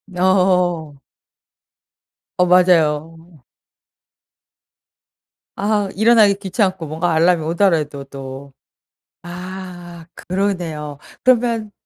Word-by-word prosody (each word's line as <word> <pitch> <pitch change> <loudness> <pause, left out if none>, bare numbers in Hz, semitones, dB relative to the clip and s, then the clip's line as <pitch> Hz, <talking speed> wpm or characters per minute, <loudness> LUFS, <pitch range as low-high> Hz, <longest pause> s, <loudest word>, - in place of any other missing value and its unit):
어. 180 -5 +1 1.4
어. 180 - +4
맞아요. 165 -3 +1 2.1
아. 205 0 0
일어나기 220 -2 +5
귀찮고 190 -3 -2
뭔가 165 +3 -2
알람이 165 0 +3
오더라도 160 -5 0
또. 135 0 -10 0.7
아. 175 -1 -9
그러네요. 175 -6 -3 0.3
그러면 230 -4 +1
175 Hz, 155 characters per minute, -19 LUFS, 160-190 Hz, 2.1 s, 일어나기